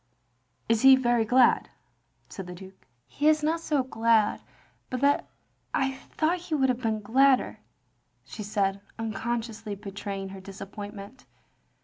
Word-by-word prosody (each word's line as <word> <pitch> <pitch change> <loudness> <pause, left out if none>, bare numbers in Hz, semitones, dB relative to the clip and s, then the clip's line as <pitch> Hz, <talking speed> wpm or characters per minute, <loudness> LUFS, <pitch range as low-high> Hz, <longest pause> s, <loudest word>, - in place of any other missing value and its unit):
" - - -45
" - - -44
Is 230 -1 +2
he 265 0 +9
very 240 -3 +2
glad?" 245 +2 +4 0.6
said 190 -2 -8
the 180 - -7
Duke. 190 +1 -14
" 120 - -46
He 295 - +2
is 305 -1 +4
not 320 +2 +1
so 300 -4 0
glad 225 -3 +2 0.5
but 255 - -3
that 285 0 +2 0.5
I 270 0 +1
thought 320 +6 -1
he 335 -2 -3
would 265 -3 +2
have 250 0 -1
been 220 -3 -1
gladder," 260 +5 +3 0.7
she 220 - -8
said, 200 -1 -1 0.2
tinconsciously 225 -1 -4
betraying 195 -1 -6
her 190 0 -9
disappointment. 200 +4 -9
225 Hz, 150 wpm, -27 LUFS, 200-265 Hz, 0.7 s, he